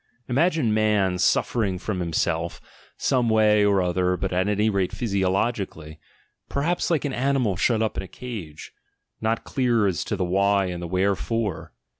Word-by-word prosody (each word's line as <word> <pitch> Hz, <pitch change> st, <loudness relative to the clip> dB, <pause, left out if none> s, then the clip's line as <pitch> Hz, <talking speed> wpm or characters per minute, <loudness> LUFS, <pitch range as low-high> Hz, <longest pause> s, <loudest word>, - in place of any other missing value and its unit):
Imagine 145 Hz, -3 st, +2 dB
man, 105 Hz, -4 st, +2 dB
suffering 100 Hz, -3 st, +1 dB
from 95 Hz, +1 st, -4 dB
himself, 85 Hz, 0 st, -1 dB, 0.4 s
some 125 Hz, -3 st, +1 dB
way 105 Hz, -1 st, +4 dB
or 100 Hz, -2 st, +3 dB
other 90 Hz, +1 st, 0 dB
but 95 Hz, +1 st, -3 dB
at 95 Hz, +2 st, +1 dB
any 105 Hz, +1 st, +1 dB
rate 100 Hz, -4 st, 0 dB
physiologically, 95 Hz, -6 st, -2 dB, 0.5 s
perhaps 165 Hz, +5 st, 0 dB
like 160 Hz, -3 st, +1 dB
an 140 Hz, -, -2 dB
animal 130 Hz, -6 st, +1 dB
shut 110 Hz, +4 st, +1 dB
up 110 Hz, -, -2 dB
in -, -, -1 dB
a 95 Hz, -, -8 dB
cage, 95 Hz, -11 st, -8 dB, 0.5 s
not 110 Hz, +1 st, 0 dB
clear 120 Hz, -5 st, +1 dB
as 95 Hz, -4 st, 0 dB
to -, -, -2 dB
the 95 Hz, -2 st, -1 dB
why 100 Hz, +2 st, +2 dB
and 90 Hz, -1 st, -4 dB
the 85 Hz, -, -4 dB
where 95 Hz, +3 st, +1 dB
fore! 115 Hz, -4 st, -3 dB
100 Hz, 165 wpm, -24 LUFS, 90-115 Hz, 0.5 s, way